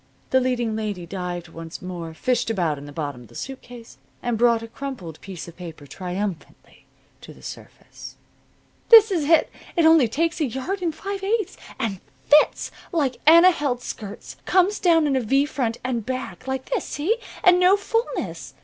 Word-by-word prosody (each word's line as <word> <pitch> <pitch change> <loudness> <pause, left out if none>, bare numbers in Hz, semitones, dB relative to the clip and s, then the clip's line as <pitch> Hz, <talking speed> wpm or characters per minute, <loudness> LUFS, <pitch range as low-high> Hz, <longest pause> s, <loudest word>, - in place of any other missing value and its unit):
The 260 - +5
leading 245 -3 0
lady 205 -5 -3
dived 175 -1 -5
once 165 0 -8
more, 170 -3 -7
fished 245 +4 0
about 170 -9 0
in 140 - -10
the - - -9
bottom 145 -4 -5
of 120 - -14
the - - -18
suit 270 0 -6
case 240 -2 -13 0.2
and 240 -1 0
brought 230 0 +3
a - - -7
crumpled 230 - -7
piece 190 -4 -8
of 170 - -11
paper 165 -4 -9
triumphantly 180 +4 -6 0.4
to - - -12
the - - -18
surface. - - -10 0.7
"This 445 -2 +9
is 330 -6 0
it. 320 +1 +4 0.2
It 335 -3 +3
only 320 -6 +6
takes 330 +8 -1
a - - +3
yard 270 - -3
and 330 -3 -1
five 390 +3 -5
eighths. 420 -1 0 0.2
And 195 -5 -2 0.2
fits! 300 +1 +4 0.2
Like 285 -8 0
Anna 335 +3 +9
Held's 275 -7 -2
skirts. 210 -4 -8
Comes 380 +2 +3
down 330 -3 +4
in 280 -2 +1
a 260 - +2
V 270 +5 +2
front 245 -6 -2
and 245 -3 -2
back 255 +3 -5
like 265 0 -4
this. - - 0
See? 370 +11 -1 0.3
And 360 -2 +6
no 365 +2 +5
fulness. 455 +3 -3
250 Hz, 185 wpm, -23 LUFS, -, 0.7 s, This